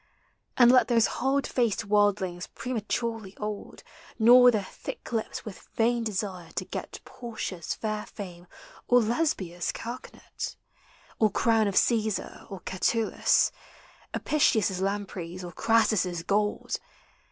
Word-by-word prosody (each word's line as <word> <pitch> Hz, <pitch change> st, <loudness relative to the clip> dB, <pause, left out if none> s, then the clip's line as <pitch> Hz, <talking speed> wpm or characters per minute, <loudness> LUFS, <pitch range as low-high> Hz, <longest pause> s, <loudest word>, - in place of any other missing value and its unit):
And 245 Hz, -1 st, +8 dB
let 250 Hz, -3 st, +5 dB
Those 230 Hz, -2 st, +4 dB, 0.2 s
hard 270 Hz, +2 st, +2 dB
faced 230 Hz, -3 st, 0 dB
worldlings 200 Hz, -4 st, +1 dB
prematurely 225 Hz, -3 st, -3 dB
old 210 Hz, -1 st, -6 dB, 0.3 s
Gnaw 245 Hz, +2 st, +8 dB
their 215 Hz, -4 st, +1 dB
thin -, -, -7 dB, 0.2 s
lips 225 Hz, -2 st, -3 dB
with 210 Hz, -4 st, -10 dB
vain 235 Hz, +1 st, +2 dB
desire 190 Hz, -5 st, -3 dB
to -, -, -3 dB
got -, -, -6 dB
Portia's 220 Hz, -8 st, -5 dB
fair 215 Hz, -1 st, -3 dB
fa.no 180 Hz, -4 st, -9 dB, 0.4 s
or 245 Hz, -, +6 dB
Lesbia's 215 Hz, -, -1 dB
carcanet, 240 Hz, +2 st, -7 dB, 0.6 s
Or 215 Hz, -, +5 dB
crown 225 Hz, +1 st, +2 dB
of 200 Hz, -, -2 dB
Caesar 220 Hz, -3 st, +1 dB
or 195 Hz, -2 st, -7 dB
Catullus, 220 Hz, +4 st, +2 dB, 0.6 s
Apicius' 215 Hz, -, +2 dB
lampreys 190 Hz, -3 st, -3 dB
or 175 Hz, -, -6 dB
Crassus' 210 Hz, -5 st, +2 dB
gold! 210 Hz, +3 st, 0 dB
215 Hz, 120 wpm, -28 LUFS, 190-235 Hz, 0.6 s, And